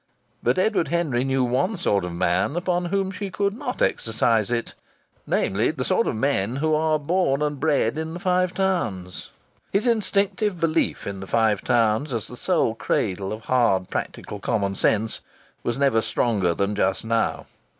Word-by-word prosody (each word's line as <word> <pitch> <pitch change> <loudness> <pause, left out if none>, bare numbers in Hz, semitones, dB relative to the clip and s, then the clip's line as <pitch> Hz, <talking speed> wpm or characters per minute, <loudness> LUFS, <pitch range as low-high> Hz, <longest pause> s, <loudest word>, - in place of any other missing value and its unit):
But - - +1
Edward 195 -2 +2
Henry 155 -8 0
knew 135 -1 +1
one 130 - 0
sort 100 - +1
of 90 - -5
men 85 - 0
upon 175 0 0
whom 190 +2 -1
she 200 0 -5
could 200 +1 -1
not 250 +1 -3
exercise 115 -1 +1
it 120 -1 -2 0.5
namely, 105 +4 +1
the 135 -5 -3
sort 190 +5 +2
of - - -1
men 115 -2 0
who 155 +3 +1
are 155 0 +2
born 150 -2 +1
and 145 -2 -2
bred 145 -3 +1
in 160 +1 -4
the - - -5
Five 180 0 +1
Towns. 115 - -2 0.4
His 200 +4 +1
instinctive 210 -3 +1
belief 165 -1 0
in 100 -1 -5
the 95 - -8
Five 110 -2 +2
Towns 120 +3 +2
as 115 -3 -2
the 125 - -10
sole 165 -5 +1
cradle 100 -4 -1
of 110 +1 -5
hard 115 -8 +2
practical 105 - -4
common 100 -3 -1
sense 110 +3 0 0.4
was 120 - -2
never 135 -5 +3
stronger 100 -8 0
than 100 +3 0
just 100 0 0
now. 115 0 0
130 Hz, 170 wpm, -24 LUFS, 110-175 Hz, 0.5 s, never